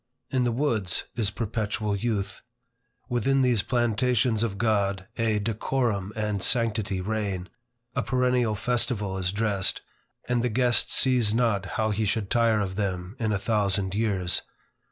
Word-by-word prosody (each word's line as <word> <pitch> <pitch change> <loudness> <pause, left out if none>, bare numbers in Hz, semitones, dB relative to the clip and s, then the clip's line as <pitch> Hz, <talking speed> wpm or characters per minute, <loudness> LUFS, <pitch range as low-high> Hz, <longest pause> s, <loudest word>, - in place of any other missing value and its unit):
In 130 -2 +1
the 120 - +1
woods, 115 - 0
is 110 -4 +1
perpetual 105 -1 -2
youth. 105 -2 -2 0.7
Within 135 +2 +2
these 120 -5 +3
plantations 120 -1 +1
of 110 -4 -1
God, 100 -3 +1
a 115 -2 +1
decorum 105 -1 -1
and 105 -2 -2
sanctity 110 -5 +1
reign, 100 -2 -3 0.5
a - - +1
perennial 125 -3 +1
festival 105 -3 -1
is 90 -1 0
dressed, 100 -2 0 0.4
and 120 -1 +1
the 125 - +1
guest 120 +1 +2
sees 125 -5 +3
not 110 -5 +1
how 110 -2 +1
he 110 +1 0
should 105 -1 -1
tire 115 -3 +3
of 95 -1 -3
them 95 -1 -3
in 110 -2 0
a 105 - +1
thousand 100 -2 0
years. 100 -4 0
110 Hz, 145 wpm, -26 LUFS, 100-120 Hz, 0.7 s, these